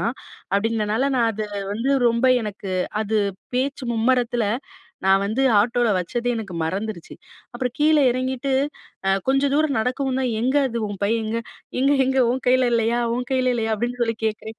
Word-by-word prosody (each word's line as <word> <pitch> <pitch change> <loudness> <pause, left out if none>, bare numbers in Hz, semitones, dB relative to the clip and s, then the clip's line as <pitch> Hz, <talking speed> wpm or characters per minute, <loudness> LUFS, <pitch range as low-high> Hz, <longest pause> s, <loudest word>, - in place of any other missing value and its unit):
தான். 230 - 0 0.4
அப்படின்றதுனால, 215 +2 0
நான் 230 -2 +3
அதை 215 0 -4 0.3
வந்து 235 +6 -1 0.2
ரொம்ப 235 +2 +1 0.2
எனக்கு 200 -2 -5 0.3
அது 220 0 0 0.4
பேச்சு 265 +1 -1
மும்மரத்தில 240 0 +1 0.6
நான் 190 0 +5
வந்து 220 +6 0 0.2
ஆட்டோல 235 +3 +2
வச்சதே 235 +7 -2
எனக்கு 205 -5 -6
மறந்துருச்சு. 190 +2 -4 0.4
அப்புறம் 250 0 -2
கீழே 305 0 +4
எறங்கிட்டு 260 +2 -2 0.6
அ - - +4 0.2
கொஞ்சம் 275 +1 +2
தூரம் 300 -2 +2
நடக்கவும்தான் 255 +2 -1
"எங்க 260 +4 +1
அது? 235 -2 -3
உன் 205 -1 -6
பை 200 - +2
எங்க?" 220 +1 -2 0.4
"எங்க 275 +2 +4
எங்க 265 +1 +1
உன் 255 +1 -2
கைல 255 0 +4
இல்லயா? 230 0 +2 0.2
உன் 250 +1 -2
கைல 255 -1 +2
இல்லயா?" 225 -2 -1
அப்டின்னு 240 +3 -3
சொல்லி 230 -1 0
கேக்கறேன் 220 0 -3
240 Hz, 160 wpm, -22 LUFS, 220-260 Hz, 0.6 s, நான்